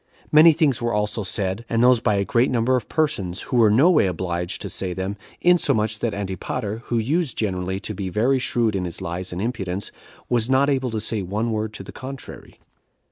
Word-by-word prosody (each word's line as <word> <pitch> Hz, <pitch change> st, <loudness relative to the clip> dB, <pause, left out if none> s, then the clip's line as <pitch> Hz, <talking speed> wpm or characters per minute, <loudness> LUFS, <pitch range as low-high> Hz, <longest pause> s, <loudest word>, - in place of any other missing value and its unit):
Many 155 Hz, +2 st, +8 dB
things 145 Hz, -7 st, +1 dB
were 120 Hz, 0 st, -1 dB
also 105 Hz, +1 st, 0 dB
said, 95 Hz, +2 st, -1 dB
and 115 Hz, 0 st, +2 dB
those 125 Hz, -1 st, +6 dB
by 105 Hz, -2 st, +1 dB
a 100 Hz, 0 st, 0 dB
great 120 Hz, +5 st, +2 dB
number 125 Hz, +1 st, +2 dB
of 120 Hz, -5 st, -3 dB
persons, 145 Hz, -, 0 dB
who 125 Hz, -, -2 dB
were 115 Hz, -3 st, +6 dB
no 135 Hz, -, +5 dB
way 150 Hz, -, +4 dB
obliged 90 Hz, -1 st, -3 dB
to -, -, -4 dB
say 95 Hz, -2 st, -3 dB
them, 95 Hz, +2 st, -3 dB, 0.3 s
insomuch 120 Hz, -12 st, +2 dB
that 120 Hz, -, -1 dB
Antipater, 100 Hz, +3 st, -4 dB
who 120 Hz, -, -1 dB
used 145 Hz, +6 st, 0 dB
generally 95 Hz, -2 st, -2 dB
to 110 Hz, -, -5 dB
be 95 Hz, -1 st, -4 dB
very 120 Hz, +8 st, +2 dB
shrewd 115 Hz, -4 st, 0 dB
in 90 Hz, -2 st, -1 dB
his 85 Hz, -, -5 dB
lies 90 Hz, 0 st, -4 dB
and 90 Hz, -, -5 dB
impudence, 100 Hz, -5 st, -3 dB, 0.4 s
was 120 Hz, 0 st, +1 dB
not 135 Hz, +2 st, +3 dB
able 130 Hz, -2 st, 0 dB
to 110 Hz, -1 st, -3 dB
say 110 Hz, 0 st, -1 dB
one 105 Hz, +5 st, -2 dB
word 110 Hz, 0 st, -2 dB
to -, -, -7 dB
the -, -, -10 dB
contrary. 135 Hz, 0 st, -9 dB
110 Hz, 210 wpm, -22 LUFS, 95-125 Hz, 0.4 s, Many